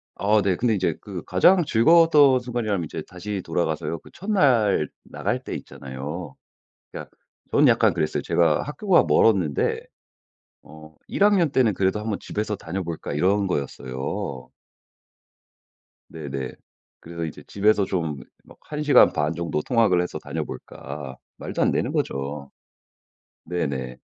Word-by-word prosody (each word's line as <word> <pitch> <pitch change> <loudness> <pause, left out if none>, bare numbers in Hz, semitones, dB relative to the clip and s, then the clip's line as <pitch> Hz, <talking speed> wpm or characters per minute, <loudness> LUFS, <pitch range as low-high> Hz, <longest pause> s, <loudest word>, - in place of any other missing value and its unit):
어 105 +1 +2
네. 95 -2 +2
근데 115 +1 +1
이제 95 -2 0
그 95 -5 -7
가장 170 - +4
즐거웠던 145 +1 +5
순간이라면 115 -7 -2
이제 - - -6
다시 100 +2 -5
돌아가서요. 80 -1 -2
그 - - -17
첫날 130 - +2 0.2
나갈 - - -3
때 - - -5
있잖아요. 70 +4 -7 0.6
그러니까 - - -8 0.4
저는 - - +4
약간 - - +4
그랬어요. 75 - -1
제가 80 -3 +2
학교가 170 +6 +2
멀었는데 90 -10 +2 0.8
어 80 0 -14
1 - - 0
학년 195 -7 +4
때는 125 -6 +3
그래도 95 +2 0
'한번 105 -1 -3
집에서 105 -1 -3
다녀 95 +4 -5
볼까?' 80 -3 -5
이런 95 +6 +2
거였어요. 65 -4 -4 1.6
네네. 70 -5 -5 0.5
그래서 85 0 -7
이제 80 - -8
집에서 100 0 +2
좀 80 -7 -2 0.3
막 - - -17
'1 150 0 -5
시간 145 - +6
반 75 +2 0
정도 85 -2 -2
통학을 110 -4 +2
해서 90 - -4
다녀볼까?' 70 -3 -7 0.2
말도 - - -4
안 - - +3
되는 - - -1
거죠. 70 +1 -3 0.9
네네. 70 -7 -3
90 Hz, 290 characters per minute, -24 LUFS, 75-115 Hz, 1.6 s, 시간